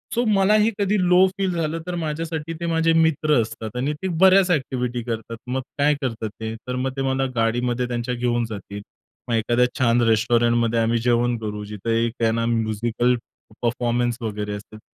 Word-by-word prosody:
So 240 Hz, -, +2 dB
मला 195 Hz, 0 st, +4 dB
हे 220 Hz, -, +3 dB
कधी 200 Hz, +1 st, +1 dB
लो 180 Hz, +1 st, +6 dB
फील 190 Hz, -2 st, 0 dB
झालं, 165 Hz, -1 st, -2 dB
तर 180 Hz, -, -3 dB
माझ्यासाठी 160 Hz, 0 st, -3 dB
ते 170 Hz, -, -3 dB
माझे 165 Hz, 0 st, +2 dB
मित्र 160 Hz, -3 st, +3 dB
असतात 110 Hz, 0 st, -6 dB
आणि 135 Hz, +4 st, 0 dB
ते 190 Hz, -, -2 dB
बऱ्याच 190 Hz, 0 st, +6 dB
एक्टिव्हिटी 125 Hz, -5 st, -1 dB
करतात. 115 Hz, -1 st, -5 dB
मग 130 Hz, +1 st, -1 dB, 0.2 s
काय 145 Hz, +1 st, +3 dB
करतात 115 Hz, -4 st, -3 dB
ते, 110 Hz, 0 st, -3 dB
तर 125 Hz, -, -2 dB
मग 130 Hz, +1 st, -1 dB
ते -, -, -1 dB
मला 135 Hz, 0 st, 0 dB
गाडीमध्ये 120 Hz, +2 st, 0 dB
त्यांच्या 120 Hz, 0 st, -2 dB
घेऊन 120 Hz, -1 st, 0 dB
जातील, 100 Hz, -1 st, -7 dB, 0.5 s
मग 115 Hz, -, +1 dB
एखाद्या 120 Hz, +2 st, +2 dB
छान 120 Hz, -1 st, +3 dB
रेस्टॉरंटमध्ये 115 Hz, +1 st, +2 dB
आम्ही 115 Hz, +1 st, +2 dB
जेवण 120 Hz, 0 st, +2 dB
करू, 105 Hz, -1 st, -5 dB
जिथं 105 Hz, +2 st, -6 dB
एक 115 Hz, +1 st, 0 dB
है 115 Hz, -, +4 dB
ना 115 Hz, 0 st, 0 dB
म्युजिकल 115 Hz, +1 st, 0 dB, 0.5 s
परफॉर्मन्स 120 Hz, 0 st, 0 dB
वगैरे 105 Hz, -2 st, -3 dB
असतील. 105 Hz, +1 st, -9 dB
120 Hz, 180 wpm, -22 LUFS, 115-150 Hz, 0.5 s, लो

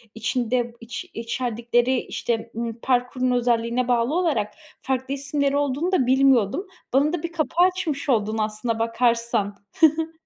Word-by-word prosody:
içinde 240 Hz, +1 st, -1 dB
iç 235 Hz, +9 st, -7 dB
içerdikleri, 240 Hz, +1 st, 0 dB
işte, 230 Hz, 0 st, -3 dB
ımm, 230 Hz, 0 st, -4 dB
parkurun 250 Hz, 0 st, +1 dB
özelliğine 240 Hz, 0 st, +1 dB
bağlı 240 Hz, +2 st, +1 dB
olarak 300 Hz, -, 0 dB, 0.3 s
farklı 265 Hz, 0 st, -2 dB
isimleri 280 Hz, 0 st, 0 dB
olduğunu 290 Hz, +5 st, 0 dB
da 325 Hz, -9 st, +3 dB
bilmiyordum. 265 Hz, -, +3 dB, 0.3 s
Bana 285 Hz, +4 st, +3 dB
da 345 Hz, -2 st, -3 dB
bir 335 Hz, -, -3 dB
kapı 330 Hz, -1 st, -2 dB
açmış 340 Hz, -7 st, 0 dB
oldun 220 Hz, -2 st, +1 dB
aslına 215 Hz, +2 st, -1 dB
bakarsan. 230 Hz, -3 st, +1 dB, 0.5 s
Hı -, -, 0 dB
hı. 325 Hz, -, -16 dB
250 Hz, 140 wpm, -23 LUFS, 230-280 Hz, 0.5 s, da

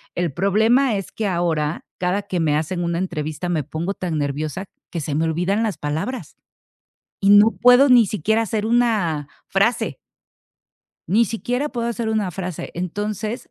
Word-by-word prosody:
El 175 Hz, -3 st, -1 dB
problema 220 Hz, -, +3 dB
es 195 Hz, -2 st, -5 dB
que 220 Hz, -, -2 dB
ahora, 170 Hz, -4 st, -1 dB
cada 180 Hz, +3 st, 0 dB
que 195 Hz, -3 st, -3 dB
me 155 Hz, -3 st, +2 dB
hacen 160 Hz, +4 st, -2 dB
una 170 Hz, -1 st, -1 dB
entrevista, 170 Hz, -1 st, -3 dB
me 160 Hz, -4 st, 0 dB
pongo 170 Hz, +7 st, -3 dB
tan 175 Hz, -5 st, -3 dB
nerviosa 150 Hz, +6 st, -3 dB, 0.2 s
que 170 Hz, -, -4 dB
se 145 Hz, 0 st, -3 dB
me 160 Hz, +2 st, +1 dB
olvidan 180 Hz, +7 st, 0 dB
las 215 Hz, -3 st, -2 dB
palabras, 160 Hz, -, -4 dB, 0.9 s
y 195 Hz, -, +4 dB
no 205 Hz, +2 st, +7 dB
puedo 250 Hz, +3 st, +6 dB
ni 245 Hz, -2 st, +7 dB
siquiera 215 Hz, +3 st, 0 dB
hacer 220 Hz, -1 st, -2 dB
una 215 Hz, -11 st, +1 dB, 0.2 s
frase. -, -, +1 dB, 1.1 s
Ni 215 Hz, +7 st, +4 dB
siquiera 245 Hz, +6 st, -2 dB
puedo 235 Hz, -4 st, -3 dB
hacer 235 Hz, -1 st, -2 dB
una 215 Hz, -4 st, 0 dB
frase. 180 Hz, -1 st, -5 dB
Entonces 210 Hz, +5 st, -4 dB
190 Hz, 160 wpm, -21 LUFS, 165-220 Hz, 1.1 s, no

